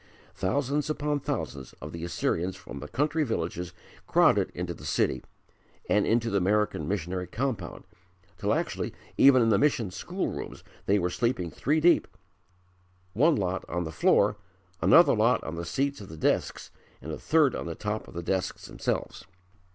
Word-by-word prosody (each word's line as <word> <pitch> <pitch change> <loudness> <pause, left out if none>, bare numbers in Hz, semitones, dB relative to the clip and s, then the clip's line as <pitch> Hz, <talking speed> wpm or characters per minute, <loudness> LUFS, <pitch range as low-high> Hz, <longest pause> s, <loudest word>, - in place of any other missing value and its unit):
Thousands 140 +9 -1
upon 150 -1 -1
thousands 70 - -4
of 75 - -9
the 85 0 -7
Assyrians 85 +1 -1
from 70 - -9
the 70 - -7
country 150 - 0
villages 90 - -3 0.4
crowded - - +4
into - - -3
the - - -13
city 65 - 0 0.6
and 105 - +2
into 115 0 +1
the 100 - +2
American 100 -5 +1
missionary 90 -1 -2
compound, 115 -3 -3 0.6
till - - 0
actually - - -2 0.2
even 130 -3 +6
in 115 - +3
the 100 - +4
mission 125 -9 +1
school - - -3
rooms - - -7 0.2
they 100 - +4
were 90 -2 0
sleeping 115 -8 -1
three 150 +5 +1
deep 170 +2 +4 1.1
one 150 - +4
lot 95 -4 -1
on 90 +1 -1
the 80 - -5
floor, 75 - +3 0.4
another 170 +2 +7
lot 115 +2 +3
on 80 - -5
the 85 +1 -5
seats 140 +5 -1
of 100 - -10
the 80 - -9
desks - - -1 0.3
and 75 +5 -7
a - - -5
third 155 -5 +3
on - - -4
the 85 - -4
top 105 +4 -4
of - - -13
the 85 - -4
desks 95 +2 -2
themselves. - - -3
100 Hz, 170 wpm, -28 LUFS, 85-135 Hz, 1.1 s, another